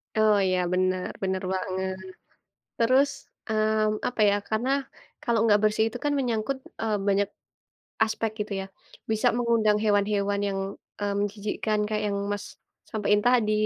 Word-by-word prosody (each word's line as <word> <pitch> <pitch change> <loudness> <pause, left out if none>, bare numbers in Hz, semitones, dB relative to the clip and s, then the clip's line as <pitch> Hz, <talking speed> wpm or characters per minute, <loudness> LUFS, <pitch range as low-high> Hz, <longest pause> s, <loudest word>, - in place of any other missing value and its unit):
Oh 215 -1 +5
iya 185 -1 +2
benar, 185 0 +1
benar 190 0 -1
banget. 190 0 -2 0.8
Terus, 260 +5 +4 0.4
mmm, 215 0 +1
apa 245 - -5
ya, - - +2
karena 225 +4 0 0.5
kalau 235 -2 +1
nggak 210 -2 +5
bersih 215 +1 +3
itu 235 +2 -7
kan 290 - +2
menyangkut, 240 0 -1 0.3
eee, 220 -2 +1
banyak 200 0 +2 0.8
aspek 220 0 -1
gitu 210 +1 -3
ya, - - -5 0.5
bisa 220 +3 +2
mengundang 230 -3 +3
hewan-hewan 205 -1 +2
yang, 195 -1 -2 0.4
mmm, 205 0 -1
menjijikkan 210 +1 -1
kayak 215 0 -1
yang 200 -1 -1
Mas 205 -1 -3 0.4
sampaiin 210 -1 +2
tadi, 240 -4 +4
215 Hz, 140 wpm, -26 LUFS, 200-220 Hz, 0.8 s, Oh